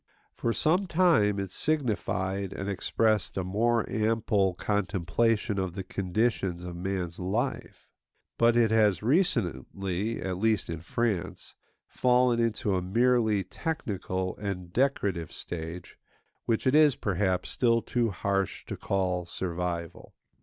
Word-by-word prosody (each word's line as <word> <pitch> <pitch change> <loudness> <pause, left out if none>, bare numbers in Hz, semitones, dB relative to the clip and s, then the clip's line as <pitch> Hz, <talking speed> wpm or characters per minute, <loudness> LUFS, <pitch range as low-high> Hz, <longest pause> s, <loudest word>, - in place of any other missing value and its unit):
For 115 - -1
some 175 - +2
time 160 - +3
it 95 -2 -4
signified 100 - -1
and 95 - -5
expressed 105 +1 0
a 95 - 0
more 115 +5 +1
ample 110 -4 +1
contemplation 105 +3 0
of 95 -2 -3
the 95 - -4
conditions 95 -1 -1
of 90 -1 -6
man's 90 -1 -3
life; 105 +9 -3 0.5
but 115 0 +4
it 115 -2 +4
has 105 -4 +3
recently 100 - 0
(at 95 -1 -3
least 110 -5 +1
in 85 -1 -5
France) 100 0 -2 0.3
fallen 125 -1 +3
into 110 -3 0
a 90 - 0
merely 110 +1 +2
technical 95 - -3
and 90 -4 -5
decorative 100 - 0
stage, 85 +1 -7 0.5
which 115 -2 0
it 130 - +3
is, 150 -2 +6
perhaps, 95 -2 -1
still 115 -2 +2
too 120 0 0
harsh 100 -1 -2
to - - -5
call 90 -3 -1
survival. 85 -2 -4
100 Hz, 125 wpm, -28 LUFS, 90-115 Hz, 0.5 s, is